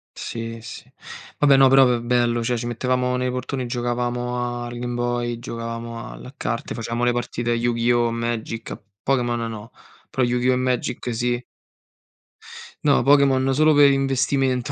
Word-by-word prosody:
Sì, 115 0 -6
sì. 115 - -10 0.5
Vabbè 140 -2 +5
no, 135 0 +7
però 135 0 +7
v 120 -1 +1
bello, 120 -1 +1
cioè 120 0 0
ci 120 - -4
mettevamo 125 +1 0
nei 125 0 -1
portoni 125 +1 -3
e - - -4
giocavamo 120 0 -2
al 120 0 -7
Game 120 0 -3
Boy, 120 0 -1
giocavamo 115 -1 -6
al - - -11
a 130 - -10
carte, 115 -5 -3
facevamo 115 +1 -3
le 120 - +4
partite 120 0 -2
a - - +3
Yu-Gi-Oh! 120 0 +1
Magic, 115 -1 -3
a - - -7 0.2
Pokémon 120 -3 +1
no, 110 +1 -8 0.4
però 130 - 0
Yu-Gi-Oh! 125 +1 +2
e - - +2
Magic 125 -1 -1
sì. 120 +1 -1 1.4
No, 145 -2 +4
Pokémon 135 -2 +4
solo 155 +2 +5
per 145 -1 +7
investimento, 135 -1 +1
120 Hz, 165 wpm, -22 LUFS, 120-130 Hz, 1.4 s, no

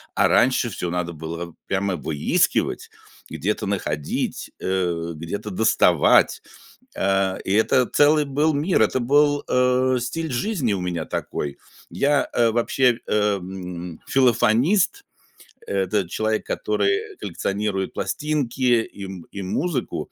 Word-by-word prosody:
а - - +4
раньше 125 -1 +3
всё 90 -3 -4
надо 85 0 -2
было 85 +2 -7
прямо 95 -1 0
выискивать, 75 -2 0 0.4
где-то 85 +7 -2
находить, 75 -7 -3
э, 85 -3 -1
где-то 95 +7 -5
доставать, 105 +3 +3 0.6
а, 95 -1 +1
и - - -5
это 110 +4 +3
целый 150 +3 +4
был 150 +3 +1
мир, 155 +6 +1
это 120 +4 +1
был, 145 +3 +3
э, 125 0 +2
стиль 160 +6 -3
жизни 135 - -1
у 100 - -1
меня 90 -3 -3
такой. 70 -2 -4 0.3
Я, 140 0 +1
э, 115 -1 +3
вообще, 120 +1 +2
м, 90 -4 -2
филофонист, 130 - +3 0.6
это 95 -1 0
человек, 110 +2 -1
который 100 -2 -1
коллекционирует 100 0 -2
пластинки 125 +1 0
и 100 -3 -9
м 95 -3 -8
и 100 - -6
музыку. 130 - -3
105 Hz, 120 wpm, -23 LUFS, 90-130 Hz, 0.6 s, а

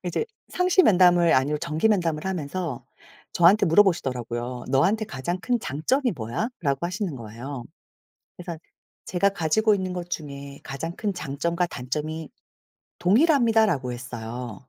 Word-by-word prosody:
이제 175 - -1 0.2
상시 365 +1 +3
면담을 175 - +5
아니고 140 +3 +2
정기 155 +8 0
면담을 170 -7 0
하면서 170 -5 -3 0.5
저한테 185 +4 +5
물어보시더라고요. 125 - +1
"너한테 185 +12 +2
가장 175 +8 -3
큰 240 +2 0
장점이 245 - 0
뭐야?"라고 140 - -2
하시는 185 -2 -3
거예요. 120 +3 -7 0.7
그래서 170 -2 -6 0.5
"제가 195 +2 +2
가지고 200 +4 +2
있는 185 -2 -3
것 175 -1 -5
중에 140 -3 -6
가장 165 +5 -5
큰 205 -2 -2
장점과 170 +2 -2
단점이 150 +4 -4 0.7
동일합니다."라고 220 - +3
했어요. 120 -1 -7
170 Hz, 325 characters per minute, -25 LUFS, 135-195 Hz, 0.7 s, 면담을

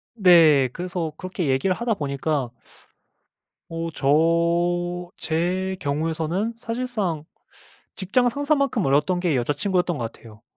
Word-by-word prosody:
네. 165 - +6
그래서 175 -2 -3
그렇게 185 -3 -4
얘기를 135 +8 +1
하다 235 +1 -1
보니까 140 - -2 1.2
어 165 0 -4
저 170 +4 +1
제 180 +4 -1
경우에서는 160 +8 -1
사실상 230 -9 -3 0.7
직장 225 +6 +1
상사만큼 280 - 0
어려웠던 150 +7 +2
게 175 -4 +1
여자친구였던 175 +7 0
것 115 -2 -4
같아요. 110 -2 -16
175 Hz, 265 characters per minute, -23 LUFS, 150-190 Hz, 1.2 s, 네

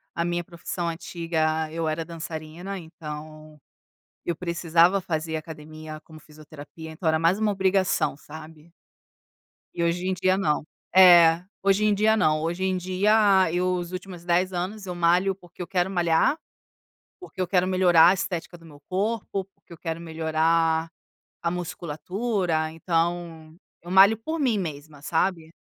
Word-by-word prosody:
a 170 - -1
minha 175 0 -1
profissão 170 0 -5
antiga 160 -2 -2
eu 165 0 -2
era 155 +1 -2
dançarina 165 +3 -7
então 155 -2 -10 0.6
eu 170 - -2
precisava 170 +2 +2
fazer 160 -3 -3
academia 155 0 -8
como 155 -1 -14
fisioterapia 155 +1 -12
então 160 +2 -5
era 160 - +3
mais 165 +5 +2
uma 215 -1 +1
obrigação, 190 -4 +1
sabe? 155 +2 -13 1.0
E 170 - -2
hoje 175 +2 0
em 190 - +1
dia 185 +1 +1
não. 155 -6 0 0.3
É. 175 -3 +8 0.2
Hoje 195 +1 +3
em 210 -1 +3
dia 215 +2 +3
não, 155 -7 +2
hoje 175 +3 -2
em 185 -1 0
dia 185 +3 0 0.4
eu 180 +1 0
os 175 -1 -4
últimos 185 -1 -8
10 180 +2 +1
anos 195 +4 -4
eu 180 -1 -5
malho 180 +3 +2
porque 180 -2 -14
eu 175 - -5
quero 180 0 0
malhar, 175 - +2 0.8
porque 370 - -13
eu 185 - 0
quero 180 0 +2
melhorar 185 -3 +5
a 185 - +4
estética 175 -2 -4
do 165 - -18
meu 145 -3 -15
corpo, 195 0 -2
porque - - -28
eu 170 - -10
quero 165 0 -5
melhorar 160 0 +1 0.5
a 170 - 0
musculatura 180 0 -2
então 165 -1 -2 0.3
eu 175 - -10
malho 195 +4 +7
por 315 +9 -4
mim 245 -7 +2
mesma, 150 -4 -7
sabe? 165 0 -1
170 Hz, 155 wpm, -25 LUFS, 160-185 Hz, 1.0 s, É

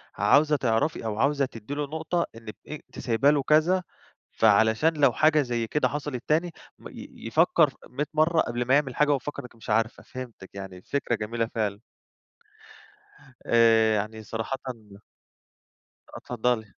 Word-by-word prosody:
عاوزة 145 +9 +4
تعرفي 120 +1 0
أو 105 -1 -3
عاوزة 140 +1 +2
تدّي 115 +1 -8
له 145 +1 -2
نقطة، 160 +3 -2
إنك 115 -1 -10
أ 155 - -6 0.2
ت - - -8
سايبة 120 +4 +2
له 145 -2 +1
كذا 165 +6 +3 0.5
فعلشان 110 +8 +3
لو 140 -4 +4
حاجة 155 +2 +4
زي 120 -4 -2
كده 150 - +1
حصلت 145 -4 -5
تاني 165 +3 +1 0.3
م - - -10
ي - - -10
يفكّر 160 +3 +4
ف 135 - -19
100 140 +5 -2
مرّة، 160 +2 +3
قبل 120 0 -2
ما 130 - +2
يعمِل 140 -4 0
حاجة 150 - +3
وهو 145 - +4
مفكّر 140 +2 -5
إنِك 125 - -13
مش 115 - -12
عارفة. 110 +2 0
فهمتِك 125 -7 -9
يعني 95 -2 -8
الفكرة 120 +5 -2
جميلة، 115 +2 -2
فعلًا. 105 -2 -1 1.7
آآ 115 -1 +4
يعني 110 +1 -4
صراحةً 115 +5 -4 1.6
آه، - - -7
اتفضلي. 120 -2 -1
125 Hz, 160 wpm, -26 LUFS, 110-150 Hz, 1.7 s, عاوزة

